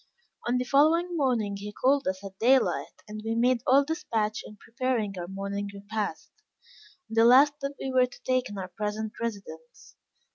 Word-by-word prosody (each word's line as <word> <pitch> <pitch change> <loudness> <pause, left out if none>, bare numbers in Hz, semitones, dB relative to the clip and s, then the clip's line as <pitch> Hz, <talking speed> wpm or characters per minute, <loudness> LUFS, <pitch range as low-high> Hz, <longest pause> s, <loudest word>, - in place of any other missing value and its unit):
On 245 +1 +2
the 250 - 0
following 320 +7 +3
morning 235 -9 0
he 205 +1 -7
called 270 +5 +1
us 190 +1 -2
at 195 -1 -10
daylight, 260 +3 +2
and 215 0 -7
we 225 +1 -2
made 240 +1 +2
all 275 +2 +5
despatch 220 -9 -2
in 210 - -12
preparing 235 -3 -2
our 175 -1 -5
morning 200 +1 -4
repast, 200 +1 -5 0.8
the 225 0 +3
last 265 +5 +7
that 275 +1 -4
we 265 - -3
were 255 -1 +4
to 250 - -16
take 255 0 0
in 205 - -7
our 185 -1 -4
present 210 +3 -4
residence. 195 -8 -7
225 Hz, 175 wpm, -27 LUFS, 205-260 Hz, 0.8 s, last